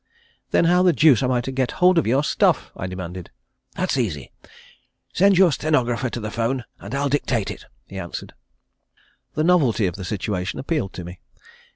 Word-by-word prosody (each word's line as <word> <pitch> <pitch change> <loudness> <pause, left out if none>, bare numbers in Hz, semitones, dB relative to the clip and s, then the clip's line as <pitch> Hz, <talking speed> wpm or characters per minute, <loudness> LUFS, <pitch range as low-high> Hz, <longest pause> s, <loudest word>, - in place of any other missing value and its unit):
"Then - - +3
how 180 +2 +4
the 180 -2 +4
deuce 150 -5 +5
am 130 - +1
I 125 -1 +1
to 135 - -5
get 130 -1 -1
hold 180 -1 +4
of 160 - -1
your 130 +5 +2
stuff?" - - +1
I 95 - -5
demanded. 90 -1 -7 0.5
"That's 185 -6 -1
easy. 90 - -3 0.8
Send 195 0 +4
your 185 -3 +6
stenographer 130 -4 0
to 120 - -5
the 110 -1 -5
'phone 120 +3 -1 0.2
and - - -7
I'll 140 +1 0
dictate 130 -6 -1
it," - - -10 0.2
he - - -8
answered. - - -7 1.0
The 155 - +1
novelty 145 - +3
of 90 0 -2
the 95 - -6
situation 95 -1 -3
appealed 140 - -2
to 90 - -7
me. 90 +1 -10
130 Hz, 185 wpm, -22 LUFS, 100-155 Hz, 1.0 s, your